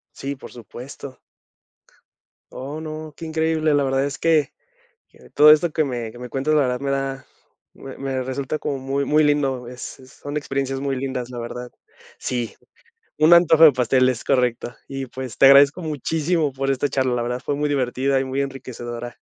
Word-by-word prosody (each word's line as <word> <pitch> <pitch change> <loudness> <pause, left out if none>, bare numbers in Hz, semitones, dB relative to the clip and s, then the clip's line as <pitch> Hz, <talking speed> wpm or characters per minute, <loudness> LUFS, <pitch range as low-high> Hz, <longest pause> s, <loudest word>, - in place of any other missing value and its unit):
Sí, 140 0 -5
por - - -11
supuesto. 125 +3 -10 1.4
Oh, 145 +4 -6
no, 155 -1 -7
qué 165 - -8
increíble. 160 -1 0
La 145 -1 +3
verdad 135 0 +1
es 145 +1 -4
que, 160 -4 +2 0.6
que - - -20
todo 150 +1 +7
esto 155 +2 +4
que 155 - +2
me 120 -4 -4
que 120 - -13
me 125 - -7
cuentas, 135 +4 -1
la 150 - +4
verdad, 125 -2 0
me 140 0 -2
da, 135 -1 -3 0.5
me 135 - -10
me 135 -1 -3
resulta 135 +3 -3
como 140 - -3
muy 135 +1 -2
muy 150 +2 +3
lindo. 135 -4 +1
Es 125 +2 -8
es 130 0 -16
son 145 +1 -6
experiencias 135 -2 -2
muy 135 -1 -2
lindas, 130 -2 -4
la 120 - -6
verdad. 125 +1 -7 0.5
Sí, 120 -4 -3 0.6
un 155 +3 +4
antojo 165 -2 +6
de 155 -3 +10
pastel, 130 +1 +2
es 125 -3 -2
correcto. 125 -2 0
Y, 135 -1 -5
pues, 130 -3 -8
te 135 - +7
agradezco 140 +5 +6
muchísimo 155 +1 -1
por 135 +1 -3
esta 135 +2 0
charla, 130 -2 0
la 120 - -1
verdad, 125 +1 -2
fue 145 - -1
muy 150 +1 -1
divertida 135 0 0
y 135 - 0
muy 130 +1 -2
enriquecedora. 120 -3 -6
135 Hz, 190 wpm, -22 LUFS, 125-145 Hz, 1.4 s, de